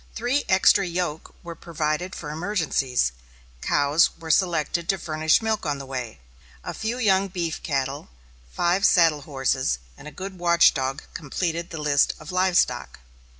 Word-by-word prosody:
Three 245 +5 0
extra 190 +1 +5
yoke 170 -3 -4
were 170 -1 -7
provided 165 +2 -3
for 150 -2 -6
emergencies. 155 - 0 0.5
Cows 145 +3 +3
were 165 -1 -4
selected 170 -1 +1
to 195 - +2
furnish 155 +3 +1
milk 220 -2 -1
on 145 -2 -1
the 135 - -8
way. 125 - -6 0.4
A - - -5
few 225 +3 -3
young 195 -5 +2
beef 170 -4 -4
cattle, 135 -2 -3 0.4
five 175 - +1
saddle 165 -7 +4
horses, 135 - -1 0.2
and 150 - -12
a - - -8
good 185 +4 -8
watch 170 -1 +5
dog 135 +1 -3
completed 165 +3 -3
the 165 - -7
list 145 -2 +2
of 155 - -9
live 185 0 +2
stock. - - 0
165 Hz, 155 wpm, -24 LUFS, 145-185 Hz, 0.5 s, extra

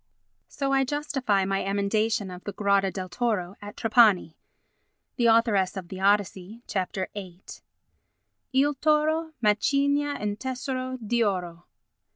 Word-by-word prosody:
So 275 -1 -2
I 270 0 +4
justify 265 -8 0
my 195 0 -1
emendation 200 0 0
of 180 0 -10
the 205 - -5
"grotta 200 -1 +2
del 185 -1 -5
toro" 200 -3 -2
at 205 +1 -9
Trapani. 220 -7 +4 0.8
[The 240 -2 +3
Authoress 220 -5 +3
of 180 -2 -7
the 190 - -7
Odyssey, 200 +2 0
Chap. 185 -2 -3 0.2
VIII.] 185 -3 -9 1.1
"Il 280 +2 +3
toro 310 +3 +1
macigna 280 +7 +2
un 205 0 -2
tesoro 255 +1 -4
di 235 0 0
oro." 175 -4 -3
210 Hz, 130 wpm, -26 LUFS, 195-260 Hz, 1.1 s, I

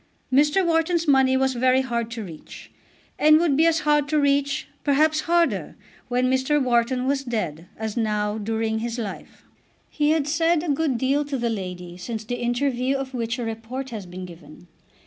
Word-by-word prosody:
Mr. 295 +7 +4
Wharton's 330 0 +1
money 265 -2 +4
was 265 0 +1
very 255 +1 +3
hard 235 -3 -2
to 230 -1 -5
reach, 165 -5 -11 0.5
and 305 0 +6
would 320 -4 +2
be 320 +4 +4
as 325 -1 +2
hard 295 -1 +2
to 305 - +2
reach, 285 0 +1 0.2
perhaps 305 +2 +3
harder, 340 -1 +1 0.3
when 250 +1 +1
Mr. 260 +3 +2
Wharton 250 0 +1
was 275 0 0
dead, 180 - -4
as 220 -1 -4
now, 210 -2 -1
during 220 +1 -1
his 235 +1 -4
life. 215 -5 -7 0.5
He 295 -1 +1
had 310 -2 +1
said 330 +1 +2
a 345 - -3
good 285 -3 +1
deal 275 +4 +1
to 280 -1 -3
the 235 -1 -1
lady 180 -4 -6
since 220 +4 -5
the 245 +3 -4
interview 255 +2 0
of 270 -1 -5
which 235 -1 -2
a 245 - -3
report 230 +4 -5
has 210 -5 -6
been 180 +1 -7
given. 175 -1 -13
260 Hz, 185 wpm, -24 LUFS, 225-290 Hz, 0.5 s, and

